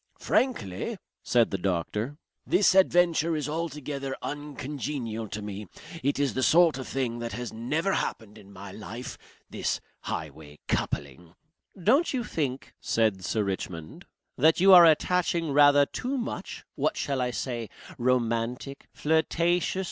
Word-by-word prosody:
"Frankly," 215 Hz, -, -1 dB, 0.2 s
said 120 Hz, -2 st, +2 dB
the 95 Hz, -, -2 dB
doctor, 100 Hz, -, -2 dB, 0.3 s
"this 190 Hz, +1 st, +3 dB
adventure 175 Hz, -3 st, +3 dB
is 150 Hz, -1 st, -2 dB
altogether 150 Hz, -4 st, -4 dB
uncongenial 140 Hz, -5 st, -4 dB
to 105 Hz, +1 st, -6 dB
me. 105 Hz, 0 st, -6 dB, 0.3 s
It 140 Hz, +2 st, 0 dB
is 140 Hz, -1 st, +1 dB
the 130 Hz, -, -1 dB
sort 165 Hz, 0 st, +5 dB
of 130 Hz, -, -6 dB
thing 125 Hz, -3 st, -2 dB
that 120 Hz, 0 st, -4 dB
has 125 Hz, -1 st, -5 dB
never 150 Hz, +12 st, -1 dB
happened 110 Hz, -2 st, -3 dB
in 100 Hz, -1 st, -16 dB
my 100 Hz, 0 st, -9 dB
life. 110 Hz, +5 st, -7 dB, 0.3 s
This -, -, -2 dB, 0.2 s
highway 75 Hz, 0 st, -6 dB
coupling 80 Hz, +5 st, -3 dB, 0.2 s
" 185 Hz, -, -18 dB
"Don't 285 Hz, +4 st, +3 dB
you 245 Hz, -, -1 dB
think," 140 Hz, -, -3 dB
said 110 Hz, -5 st, 0 dB
Sir 110 Hz, +2 st, 0 dB
Richmond, 90 Hz, -5 st, -5 dB, 0.3 s
"that 160 Hz, +5 st, +5 dB
you 190 Hz, +2 st, +7 dB
are 175 Hz, -2 st, +10 dB
attaching 170 Hz, 0 st, +2 dB
rather 145 Hz, 0 st, +6 dB
too 255 Hz, -, -3 dB
much 240 Hz, -, -5 dB
what -, -, -1 dB
shall 135 Hz, -2 st, -1 dB
I 125 Hz, -, 0 dB
say 120 Hz, -2 st, -4 dB, 0.3 s
romantic? 125 Hz, +2 st, -1 dB
flirtatious? 170 Hz, +4 st, +1 dB
135 Hz, 140 wpm, -27 LUFS, 110-165 Hz, 0.3 s, are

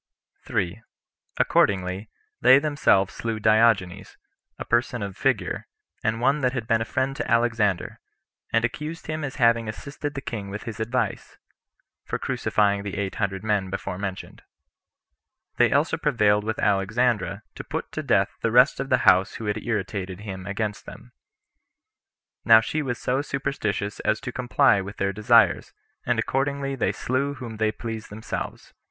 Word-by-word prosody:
Accordingly, 95 Hz, +1 st, +1 dB, 0.3 s
they 130 Hz, -, +8 dB
themselves 140 Hz, -10 st, +2 dB
slew 115 Hz, -1 st, -3 dB
Diogenes, 110 Hz, -4 st, +2 dB, 0.4 s
a -, -, -6 dB
person 120 Hz, -1 st, 0 dB
of 100 Hz, -2 st, -5 dB
figure, -, -, -1 dB, 0.4 s
and 110 Hz, +1 st, 0 dB
one 140 Hz, +5 st, +2 dB
that 125 Hz, -1 st, +1 dB
had 125 Hz, -4 st, -3 dB
been 115 Hz, 0 st, +2 dB
a -, -, -1 dB
friend 130 Hz, +3 st, -1 dB
to -, -, -3 dB
Alexander; 115 Hz, -5 st, +1 dB, 0.5 s
and 115 Hz, 0 st, +3 dB
accused 150 Hz, +7 st, -5 dB
him 155 Hz, 0 st, -4 dB
as 135 Hz, -2 st, -4 dB
having 115 Hz, -3 st, +3 dB
assisted 145 Hz, +6 st, -6 dB
the -, -, -2 dB
king 105 Hz, -6 st, -5 dB
with 105 Hz, +2 st, -6 dB
his 115 Hz, -2 st, -7 dB
advice, 120 Hz, +3 st, -2 dB, 0.7 s
for -, -, -3 dB
crucifying 100 Hz, -1 st, +1 dB
the 100 Hz, -2 st, -5 dB
eight 100 Hz, -2 st, -2 dB
hundred 95 Hz, -1 st, -1 dB
men 105 Hz, -3 st, 0 dB
[before 90 Hz, -1 st, -4 dB
mentioned.] 95 Hz, -2 st, -6 dB, 1.2 s
They -, -, +4 dB
also -, -, +2 dB
prevailed 105 Hz, -2 st, +2 dB
with 110 Hz, 0 st, -2 dB
Alexandra 105 Hz, +3 st, +1 dB
to -, -, -8 dB
put -, -, -5 dB
to -, -, -3 dB
death -, -, +2 dB
the -, -, +1 dB
rest -, -, +5 dB
of -, -, -3 dB
those 95 Hz, +1 st, +4 dB
who 115 Hz, -, -6 dB
had 105 Hz, +1 st, -2 dB
irritated 100 Hz, -4 st, -3 dB
him 95 Hz, -3 st, -7 dB
against 105 Hz, +1 st, -3 dB
them. -, -, -11 dB, 1.3 s
Now 115 Hz, -1 st, +8 dB
she 155 Hz, +7 st, -2 dB
was 125 Hz, -4 st, -3 dB
so 130 Hz, +2 st, 0 dB
superstitious 135 Hz, -8 st, -3 dB
as 110 Hz, -, 0 dB
to 130 Hz, -2 st, -5 dB
comply 125 Hz, -3 st, +3 dB
with 100 Hz, +2 st, -8 dB
their 100 Hz, 0 st, 0 dB
desires, 110 Hz, +3 st, +3 dB, 0.3 s
and -, -, +2 dB
accordingly 140 Hz, 0 st, -1 dB
they 130 Hz, -, 0 dB
slew 140 Hz, +3 st, -2 dB
whom 120 Hz, -4 st, -8 dB
they 110 Hz, 0 st, +1 dB
pleased 115 Hz, -1 st, -6 dB
themselves. 110 Hz, +2 st, -6 dB
110 Hz, 155 wpm, -25 LUFS, 100-125 Hz, 1.3 s, they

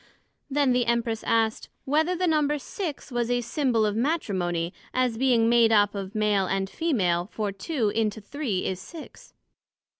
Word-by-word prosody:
Then 280 Hz, -1 st, +2 dB
the 245 Hz, -1 st, +1 dB
Empress 235 Hz, -1 st, 0 dB
asked, 225 Hz, -1 st, +1 dB, 0.2 s
Whether 315 Hz, +6 st, +2 dB
the 365 Hz, +1 st, 0 dB
number 300 Hz, -3 st, +2 dB
of 290 Hz, -, -6 dB
six 325 Hz, -8 st, -5 dB
was 240 Hz, -1 st, -1 dB
a 245 Hz, 0 st, +1 dB
symbole 235 Hz, -2 st, +1 dB
of 210 Hz, -, -2 dB
Matrimony, 190 Hz, -, -1 dB, 0.2 s
as 255 Hz, -2 st, +1 dB
being 235 Hz, -2 st, +3 dB
made 235 Hz, -1 st, +5 dB
up 205 Hz, -2 st, +4 dB
of 200 Hz, 0 st, -6 dB
Male 210 Hz, -3 st, +2 dB
and 195 Hz, +1 st, -1 dB
Femal, 190 Hz, -, 0 dB
for 210 Hz, -3 st, -3 dB
two 215 Hz, -, -1 dB
into 220 Hz, 0 st, -1 dB
three 215 Hz, -3 st, -3 dB
is 185 Hz, -1 st, -2 dB
six. 320 Hz, -, -12 dB
230 Hz, 170 wpm, -26 LUFS, 205-280 Hz, 0.2 s, made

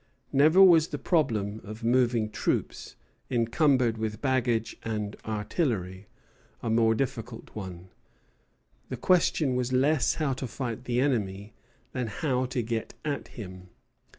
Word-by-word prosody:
Never 155 Hz, +7 st, +6 dB
was 165 Hz, -4 st, +7 dB
the 150 Hz, -, -4 dB
problem 110 Hz, -, 0 dB
of 110 Hz, +4 st, -9 dB
moving 120 Hz, -2 st, +2 dB
troops, -, -, -2 dB, 0.3 s
encumbered 120 Hz, -1 st, +2 dB
with 110 Hz, -1 st, -3 dB
baggage 125 Hz, -4 st, 0 dB
and 105 Hz, -2 st, -3 dB
artillery, 105 Hz, -, -2 dB, 0.6 s
a 115 Hz, -, -1 dB
more 115 Hz, 0 st, +4 dB
difficult 115 Hz, -2 st, -4 dB
one. 95 Hz, -3 st, -7 dB, 1.0 s
The -, -, -4 dB
question 165 Hz, -6 st, +2 dB
was 125 Hz, 0 st, -1 dB
less 135 Hz, +2 st, +2 dB
how 150 Hz, -4 st, 0 dB
to 130 Hz, 0 st, -4 dB
fight 120 Hz, 0 st, -5 dB
the 120 Hz, 0 st, 0 dB
enemy 105 Hz, -6 st, -1 dB, 0.4 s
than 125 Hz, -3 st, -2 dB
how 125 Hz, +4 st, -1 dB
to 125 Hz, -2 st, -2 dB
get 115 Hz, 0 st, -3 dB
at 145 Hz, -2 st, -2 dB
him. 95 Hz, -4 st, -9 dB
120 Hz, 130 wpm, -28 LUFS, 110-135 Hz, 1.0 s, was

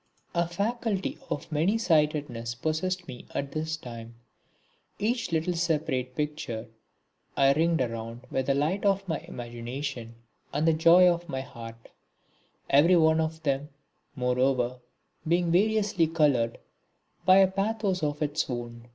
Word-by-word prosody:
A 170 Hz, -1 st, +1 dB
faculty 205 Hz, +2 st, -2 dB
of 145 Hz, -, -4 dB
many 165 Hz, +9 st, +2 dB
sightedness 150 Hz, -, 0 dB
possessed 175 Hz, +7 st, -2 dB
me 125 Hz, -2 st, -9 dB
at 140 Hz, 0 st, -2 dB
this 155 Hz, +1 st, -2 dB
time. 115 Hz, -4 st, -9 dB, 0.8 s
Each 230 Hz, -1 st, -1 dB
little 165 Hz, +2 st, 0 dB
separate 150 Hz, -7 st, -1 dB
picture 145 Hz, -7 st, -4 dB, 0.7 s
I 135 Hz, 0 st, +5 dB
ringed 165 Hz, 0 st, +2 dB
round 115 Hz, -1 st, -4 dB
with 130 Hz, -1 st, -1 dB
the 135 Hz, -, +3 dB
light 155 Hz, +8 st, 0 dB
of 195 Hz, -1 st, +1 dB
my 160 Hz, -3 st, -1 dB
imagination 120 Hz, 0 st, -6 dB, 0.4 s
and 150 Hz, +3 st, 0 dB
the 165 Hz, -, +5 dB
joy 170 Hz, +3 st, +6 dB
of 175 Hz, -1 st, 0 dB
my 130 Hz, -3 st, -2 dB
heart; 115 Hz, -3 st, -11 dB, 0.8 s
every 160 Hz, +6 st, +5 dB
one 160 Hz, -1 st, +4 dB
of 160 Hz, 0 st, -3 dB
them, 140 Hz, 0 st, -1 dB, 0.5 s
moreover, 125 Hz, 0 st, +1 dB, 0.5 s
being 170 Hz, +1 st, +2 dB
variously 205 Hz, -2 st, +2 dB
coloured 145 Hz, -8 st, +2 dB, 0.7 s
by 190 Hz, 0 st, +6 dB
a 195 Hz, -1 st, +7 dB
pathos 195 Hz, -1 st, -1 dB
of 150 Hz, 0 st, -1 dB
its 150 Hz, 0 st, -1 dB
own. 120 Hz, -1 st, -6 dB
155 Hz, 135 wpm, -28 LUFS, 125-175 Hz, 0.8 s, a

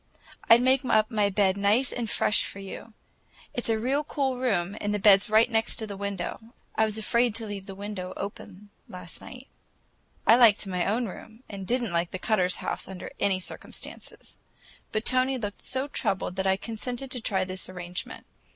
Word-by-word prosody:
I'd 235 Hz, +2 st, +8 dB
make 260 Hz, +1 st, +4 dB
up 215 Hz, -2 st, +2 dB
my 210 Hz, -2 st, +2 dB
bed 195 Hz, -1 st, +2 dB
nice 210 Hz, +6 st, +3 dB
and 235 Hz, -3 st, -3 dB
fresh 210 Hz, -, +2 dB
for -, -, -6 dB
you. 195 Hz, +3 st, -8 dB, 0.6 s
It's 245 Hz, -, 0 dB
a 225 Hz, -, +3 dB
real 265 Hz, +6 st, 0 dB
cool 275 Hz, -3 st, -1 dB
room, 200 Hz, -7 st, 0 dB
and 205 Hz, 0 st, 0 dB
the -, -, +1 dB
bed's 200 Hz, 0 st, +6 dB
right 220 Hz, +2 st, +5 dB
next 225 Hz, -1 st, +1 dB
the 200 Hz, -, -6 dB
window. 200 Hz, -3 st, -4 dB, 0.3 s
I 220 Hz, -, +3 dB
was 215 Hz, 0 st, -2 dB
afraid 235 Hz, +1 st, +2 dB
to 225 Hz, -1 st, -3 dB
leave 200 Hz, -2 st, -6 dB
the 195 Hz, -, -7 dB
window 195 Hz, -2 st, -5 dB
open 205 Hz, 0 st, -8 dB, 0.2 s
last 180 Hz, -2 st, -8 dB
night." 255 Hz, 0 st, -10 dB, 0.8 s
I 230 Hz, -, +7 dB
liked 225 Hz, -4 st, +6 dB
my 180 Hz, -2 st, -1 dB
own 230 Hz, +5 st, +1 dB
room, 220 Hz, +5 st, -11 dB
and 200 Hz, -2 st, -7 dB
I -, -, -6 dB
did 245 Hz, +4 st, +1 dB
n't 210 Hz, -7 st, -3 dB
like 170 Hz, 0 st, +1 dB
the -, -, -5 dB
Cutters' 185 Hz, -2 st, +1 dB
house -, -, -3 dB
under 190 Hz, -1 st, -7 dB
any 195 Hz, -2 st, +2 dB
circumstances; 185 Hz, -, -9 dB, 0.5 s
but 215 Hz, +1 st, -1 dB
Tony 255 Hz, +1 st, +3 dB
looked 205 Hz, -4 st, -5 dB
so 260 Hz, +2 st, 0 dB
troubled 190 Hz, -9 st, -1 dB
that 190 Hz, 0 st, 0 dB
I 190 Hz, 0 st, +3 dB
consented 245 Hz, +5 st, -4 dB
to 250 Hz, -, -2 dB
try 195 Hz, -4 st, +1 dB
this 185 Hz, 0 st, -5 dB
arrangement. 180 Hz, -1 st, -6 dB
210 Hz, 195 wpm, -27 LUFS, 190-240 Hz, 0.8 s, I'd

